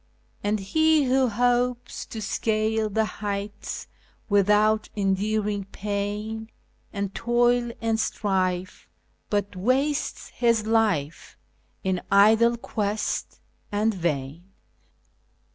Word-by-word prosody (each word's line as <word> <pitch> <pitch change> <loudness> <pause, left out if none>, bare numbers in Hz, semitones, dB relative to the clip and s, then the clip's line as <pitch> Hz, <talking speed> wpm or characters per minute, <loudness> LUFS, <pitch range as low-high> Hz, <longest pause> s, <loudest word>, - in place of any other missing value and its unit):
" - - -37
And 205 +1 +1
lie 195 - -8
wlio 275 -1 +3
hopes 245 +2 0
to 220 -2 -6
scale 215 +1 0
the 220 +2 +1
heights 205 -1 -5 0.4
without 210 +2 +3
enduring 205 +1 0
pain, 210 +2 -4 0.4
And 200 -1 -3
toil 240 0 +2
and 225 -1 0
strife, 185 -4 -1 0.4
but 205 -1 -1
wastes 265 +9 0
his 230 -3 +1
life 210 -10 0 0.5
in 185 -1 0
idle 220 +4 +5
cjuest 210 -2 -3 0.3
and 215 +2 +1
vain." 165 -2 -3
215 Hz, 95 wpm, -25 LUFS, 200-230 Hz, 0.5 s, idle